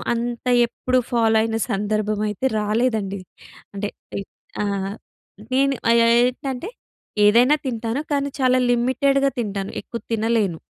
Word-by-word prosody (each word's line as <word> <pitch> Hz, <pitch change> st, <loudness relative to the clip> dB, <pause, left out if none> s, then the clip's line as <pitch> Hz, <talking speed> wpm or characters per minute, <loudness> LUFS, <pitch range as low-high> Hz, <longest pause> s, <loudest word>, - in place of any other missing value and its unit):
అంత 240 Hz, +1 st, -4 dB, 0.2 s
ఎప్పుడు 255 Hz, +1 st, 0 dB
ఫాలో 225 Hz, -2 st, +3 dB
అయిన 225 Hz, 0 st, -1 dB
సందర్భమయితే 210 Hz, +2 st, -1 dB
రాలేదండి. 210 Hz, -3 st, 0 dB, 0.5 s
అంటే, 205 Hz, +1 st, -2 dB, 0.3 s
ఏ -, -, -3 dB, 0.4 s
ఆ! -, -, -1 dB, 0.9 s
నేను 275 Hz, +1 st, +3 dB
ఆహ్, 235 Hz, -, +5 dB
యాయ్ 230 Hz, +1 st, +5 dB
ఏంటంటే, 265 Hz, -, -4 dB, 0.6 s
ఏదైనా 245 Hz, +7 st, +6 dB
తింటాను, 235 Hz, +2 st, -2 dB
కానీ 280 Hz, 0 st, 0 dB
చాలా 255 Hz, 0 st, +4 dB
లిమిటెడ్‌గా 275 Hz, +3 st, +2 dB
తింటాను. 200 Hz, -2 st, -4 dB
ఎక్కువ 235 Hz, -, -7 dB
తినలేను. 220 Hz, -5 st, +1 dB
230 Hz, 120 wpm, -22 LUFS, 215-255 Hz, 0.9 s, ఏదైనా